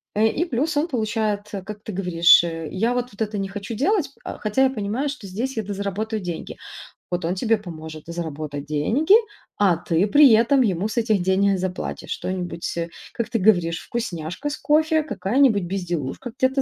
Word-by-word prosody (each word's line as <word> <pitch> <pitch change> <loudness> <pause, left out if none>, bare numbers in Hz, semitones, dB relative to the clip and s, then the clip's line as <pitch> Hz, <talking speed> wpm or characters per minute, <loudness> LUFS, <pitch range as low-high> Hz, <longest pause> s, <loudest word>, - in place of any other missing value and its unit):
Э, 215 +1 +3
и 310 +9 0
плюс 295 +1 -1
он 305 +4 +2
получает, 215 -5 -1 0.2
как 210 0 -8
ты 220 - -6
говоришь, 175 -3 +5
э, 165 -2 -4
я 225 +6 +1
вот, 245 0 -2
вот 200 - -12
это 210 -1 -1
не 195 -1 -2
хочу 205 +3 -6
делать, 325 - +1
а - - -6
хотя 215 +5 +1
я 265 - +4
понимаю, 240 +4 -2
что 275 -8 -7
здесь 235 +7 -4
я 220 - 0
дозаработаю 205 +2 -3
деньги. 175 -2 -6 0.5
Вот 175 -1 -1
он 175 +3 0
тебе 225 +3 +2
поможет 160 -5 -9
заработать 155 -4 -5
деньги, 220 - +2 0.4
а 190 -5 +3
ты 170 +3 +1
при 285 +4 +7
этом 250 +5 +4
ему 195 -3 +1
с 230 - -6
этих 220 -4 +2
денег 190 +1 +2
заплатишь 185 0 -4
что-нибудь, 180 -2 -4
э, 170 0 -1 0.3
как 235 - -3
ты 230 - 0
говоришь: 175 -5 +3
вкусняшка 210 - -4
с 295 - -4
кофе, 315 +2 +2
какая-нибудь 215 -2 +2
безделушка, 175 - -4
где-то 265 +1 +2
205 Hz, 185 wpm, -23 LUFS, 175-245 Hz, 0.5 s, при